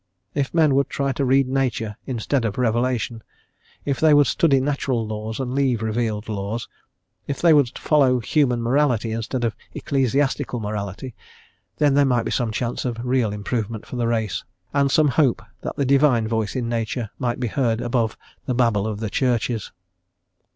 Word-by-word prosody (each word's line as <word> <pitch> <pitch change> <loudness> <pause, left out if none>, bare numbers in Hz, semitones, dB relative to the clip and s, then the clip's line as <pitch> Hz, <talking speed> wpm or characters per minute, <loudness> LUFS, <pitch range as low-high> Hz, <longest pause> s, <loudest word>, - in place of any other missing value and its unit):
If 140 -2 -1
men 160 -4 +3
would 135 0 +2
try 140 -1 -1
to 135 +2 -2
read 135 0 +3
nature 125 -5 -1
instead 130 +1 -1
of 110 -3 -2
revelation, 120 -1 0 0.6
if 140 -2 -1
they 155 -2 +5
would 145 0 +6
study 140 -3 +3
natural 130 -4 -1
laws 110 +1 -5
and 130 -1 -3
leave 130 -5 +1
revealed 110 -1 -1
laws, 105 +2 -3 0.6
if 140 - -3
they 170 -2 +5
would 140 -4 +3
follow 135 -5 +3
human 125 -1 +1
morality 120 -3 +1
instead 115 +3 -3
of 115 -2 0 0.2
ecclesiastical 135 -2 0
morality, 105 +3 -5 0.6
then 145 -2 +3
there 145 +1 +5
might 125 -4 +1
be - - -2
some 120 -3 0
chance 120 +2 -2
of 120 -2 -2
real 125 -4 +1
improvement 105 +1 -3
for - - -8
the 120 -1 0
race, 110 -4 -1 0.3
and 140 -1 +3
some 150 +1 +4
hope 130 -4 +2 0.2
that - - -5
the 140 - 0
Divine 135 -4 +3
Voice 110 -2 -1
in 125 -2 -1
Nature 115 -1 -2
might 120 -2 -1
be 125 - -1
heard 115 -2 0
above 120 -2 -1 0.3
the 125 - 0
babble 115 -4 +2
of 110 -1 -4
the 110 - -2
Churches. 120 -4 0
125 Hz, 175 wpm, -22 LUFS, 110-135 Hz, 0.6 s, would